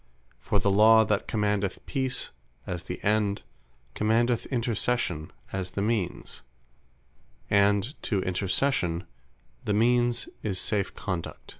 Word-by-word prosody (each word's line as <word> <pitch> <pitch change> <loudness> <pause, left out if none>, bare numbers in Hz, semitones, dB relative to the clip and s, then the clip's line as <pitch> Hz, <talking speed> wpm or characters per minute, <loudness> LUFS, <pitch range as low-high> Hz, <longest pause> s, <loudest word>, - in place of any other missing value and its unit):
For 100 - 0
the 100 +2 +2
Law 110 +2 +7
that 105 -1 0
commandeth 105 -2 -1
Peace, 130 -2 -1 0.3
as 90 -2 -5
the 90 - -5
End, 105 -1 +1 0.5
commandeth 115 +2 +1
Intercession, 115 - -1 0.2
as 95 -1 -2
the 100 - +1
Means; 105 -5 -2 1.1
and 100 +4 +3
to 100 - 0
Intercession 95 -1 0 0.6
the 105 - 0
Means 120 +2 +2
is 95 -4 -1
safe 100 -2 -1
Conduct. 90 -4 -5
105 Hz, 115 wpm, -27 LUFS, 95-115 Hz, 1.1 s, Law